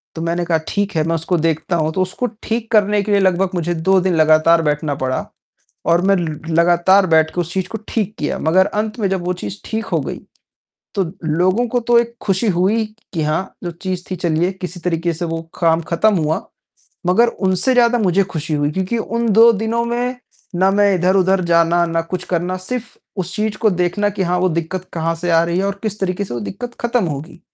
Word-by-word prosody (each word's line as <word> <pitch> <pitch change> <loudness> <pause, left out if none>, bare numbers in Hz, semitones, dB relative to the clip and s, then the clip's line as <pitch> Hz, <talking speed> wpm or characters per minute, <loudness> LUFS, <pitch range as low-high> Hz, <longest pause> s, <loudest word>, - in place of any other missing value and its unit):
तो 160 - -5
मैंने 170 +1 -1
कहा 165 -1 +2
ठीक 205 -2 -1
है, 155 - +2
मैं 165 - +1
उसको 165 +2 -1
देखता 165 +2 0
हूँ, 155 -1 0
तो 185 - 0
उसको 185 +7 -1 0.2
ठीक 225 0 -3
करने 210 -1 +3
के 210 - -3
लिए 200 - +4
लगभग 185 0 +2
मुझे 175 0 -1
2 190 +4 +3
दिन 185 -2 +1
लगातार 155 +1 +5
बैठना 150 -1 -1
पड़ा 130 0 -1 0.6
और 170 +1 +4
मैं 195 0 +4
ल 160 -4 -3
लगातार 175 +4 +4
बैठके 160 +1 +2
उस 175 +1 -4
चीज़ 190 -1 -1
को 220 - -5
ठीक 215 -2 -2
किया। 150 - -2
मगर 185 +4 +3
अंत 215 +2 -3
में 200 -3 +1
जब 185 -2 -2
वो 180 - 0
चीज़ 200 - -6
ठीक 220 0 -3
हो - - 0
गई, - - -5 0.8
तो 195 - +2 0.2
लोगों 185 +9 +1
को 245 +2 0
तो 240 0 +3
एक 235 0 -2
ख़ुशी 195 +3 +1
हुई 195 +5 +1 0.3
कि 160 -2 -1
हाँ, 155 +5 -1
जो 175 - -3
चीज़ 180 +1 -5
थी 185 - -2
चलिए 170 +1 0
किसी 180 -1 -7
तरीके 170 -1 -1
से 175 +2 -4
वो 165 0 -3 0.2
काम 165 -1 +3
ख़त्म 210 +5 +3
हुआ, 155 0 -1 0.6
मगर 230 +7 +4
उनसे 190 +2 0
ज़्यादा 240 0 +4
मुझे 195 -2 +2
ख़ुशी 155 -1 -3
हुई। 145 0 +1
क्योंकि 190 +7 -2
उन 230 +1 -2
2 230 +3 +7
दिनों 225 +2 -1
में, 245 +2 -2 0.4
ना 190 +2 +3
मैं 200 0 +3
इधर-उधर 185 +1 +2
जाना, 170 0 +3
ना 165 0 0
कुछ 180 +2 -5
करना, 180 +1 -1
सिर्फ़ 225 +5 -6 0.2
उस 180 0 -3
चीज़ 215 0 -1
को 220 -2 +3
देखना 180 +3 0
कि 195 - -3
हाँ, 180 0 0
वो 185 +1 +2
दिक्कत 170 +2 -3
कहाँ 165 0 -1
से 175 +1 -3
आ 165 0 +5
रही 170 +1 -1
है 195 - 0
और 200 0 -3
किस 215 -1 -4
तरीके 190 +1 -1
से 120 - -6
वो 120 - -3
दिक्कत 240 - -6
खत्म 235 -3 +1
होगी। 150 +1 -6
185 Hz, 220 wpm, -18 LUFS, 165-205 Hz, 0.8 s, 2